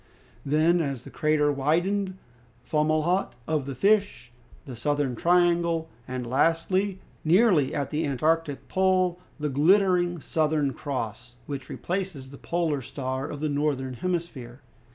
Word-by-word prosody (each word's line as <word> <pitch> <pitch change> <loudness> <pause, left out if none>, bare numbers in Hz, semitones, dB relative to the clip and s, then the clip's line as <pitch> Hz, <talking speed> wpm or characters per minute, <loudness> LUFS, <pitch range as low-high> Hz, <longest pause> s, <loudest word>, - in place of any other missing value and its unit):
Then, 160 +4 +3
as 135 -5 -3
the - - -11
crater 150 -1 +2
widened, 175 +8 +1
appeared 125 -3 -4
Fomalhaut 155 +5 +1
of 150 -4 -1
the 135 - -4
Fish, 200 - +1 0.3
the 130 -4 -7
Southern 145 +1 -1
Triangle, 170 +1 +2 0.2
and 125 -1 -4
lastly, 165 +9 +1 0.3
nearly 165 - +4
at 140 -2 -2
the 155 +1 0
Antarctic 155 +2 0
Pole, 185 -2 +2 0.2
the 150 0 -1
glittering 175 +3 +3
Southern 150 -2 0
Cross, 120 -2 -5
which 135 -2 -6
replaces 175 -8 -4
the 140 - -11
Polar 165 -5 -1
Star 130 +1 -4
of 145 - -6
the 155 - 0
Northern 140 -3 -1
Hemisphere. 140 -5 -4
150 Hz, 130 wpm, -26 LUFS, 135-175 Hz, 0.3 s, nearly